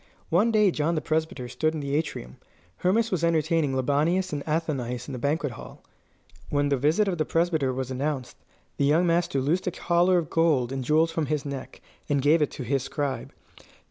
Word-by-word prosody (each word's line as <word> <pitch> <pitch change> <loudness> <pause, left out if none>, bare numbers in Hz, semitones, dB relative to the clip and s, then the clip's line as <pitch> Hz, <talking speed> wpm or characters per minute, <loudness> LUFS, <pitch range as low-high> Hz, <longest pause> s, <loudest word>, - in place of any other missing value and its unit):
One 200 +8 +3
day 210 -3 +4
John 160 +1 0
the - - +1
Presbyter 155 -5 -2
stood 155 +6 -1
in - - -3
the 140 -1 -2
atrium. 145 - -3 0.4
Hermas 220 +5 +1
was 175 -3 -1
entertaining 160 -3 +1
Libanius 150 +7 +1
and 145 -1 -3
Athenais 135 -6 -2
in 140 - -6
the 125 - -5
banquet 145 +2 0
hall. 120 - -11 0.7
When 145 0 +1
the 140 - +3
visit 155 +10 +2
of 180 -4 -1
the - - +3
Presbyter 160 -5 +1
was 130 0 -4
announced, 135 -1 -3 0.4
the 140 - +2
young 155 +5 +3
master 170 -4 +1
loosed 155 +9 0
a - - +1
collar 175 +1 +2
of 165 -4 -2
gold 150 -7 +2
and 135 -1 -3
jewels 160 +5 +3
from 160 -2 -1
his 150 0 -1
neck, 140 -2 -7 0.3
and 145 -1 +2
gave 150 +4 +4
it 150 - +2
to 140 - -7
his 135 +2 0
scribe. 135 -2 -3
150 Hz, 200 wpm, -26 LUFS, 135-165 Hz, 0.7 s, day